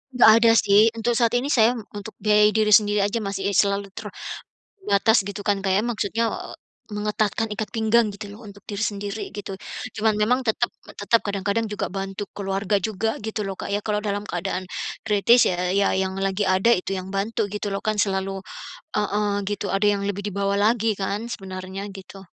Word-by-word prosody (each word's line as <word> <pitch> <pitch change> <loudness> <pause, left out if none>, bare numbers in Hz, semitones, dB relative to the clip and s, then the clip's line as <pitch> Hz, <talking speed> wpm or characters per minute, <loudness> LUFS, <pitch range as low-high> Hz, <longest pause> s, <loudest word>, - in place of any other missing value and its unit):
Nggak 240 -3 +7
ada 230 -1 +6
sih, 210 +2 +5
untuk 235 +1 0
saat 235 0 +2
ini 270 +4 -2
saya 235 +1 +4 0.2
untuk 205 +1 -8
biayai 210 0 +4
diri 215 0 +2
sendiri 205 0 +5
aja 225 +2 -1
masih 195 0 -2
selalu 200 0 +1 0.7
terbatas, 220 - +2
gitu 200 +1 -6
kan 205 -2 +1
Kak 190 -1 0
ya. 210 - +2
Maksudnya, 230 -1 -1
e - - -7 0.3
mengetatkan 210 +1 -1
ikat 210 -1 -4
pinggang 225 0 +2
gitu 205 +1 -8
loh 230 - -13
untuk 200 -1 -14
diri 205 0 -5
sendiri, 205 0 -3
gitu. 200 -1 -6 0.4
Cuman 220 -1 +1
memang 245 +5 +2
tetap 240 0 0 0.3
tetap 225 +3 +3
kadang-kadang 205 +2 -1
juga 210 - -2
bantu 195 +1 -4
keluarga 200 0 -1
juga, 220 +1 -1
gitu 215 -1 -3
lho 195 - -3
Kak - - -6
ya. 205 +1 -2
Kalau 210 -1 0
dalam 205 -1 -2
keadaan 180 +1 -3 0.4
kritis 225 +3 +5
ya 180 0 0
ya 200 - +3
yang 190 0 -1
lagi 195 +1 0
ada 190 +5 +4
itu 190 -1 0
yang 185 +1 -6
bantu, 215 +3 -1
gitu 210 0 -3
lho, 195 - -2
kan 215 -1 +1
selalu 195 -1 -1 0.5
heeh, 210 0 0 0.2
gitu, 205 0 -2
ada 195 +1 +2
yang 200 -1 +1
lebih 200 0 -2
di - - -3
bawah 200 0 0
lagi 220 +1 +2
kan 200 +3 -2
sebenarnya, 190 0 -6
gitu. 195 0 -11
205 Hz, 190 wpm, -23 LUFS, 195-220 Hz, 0.7 s, Nggak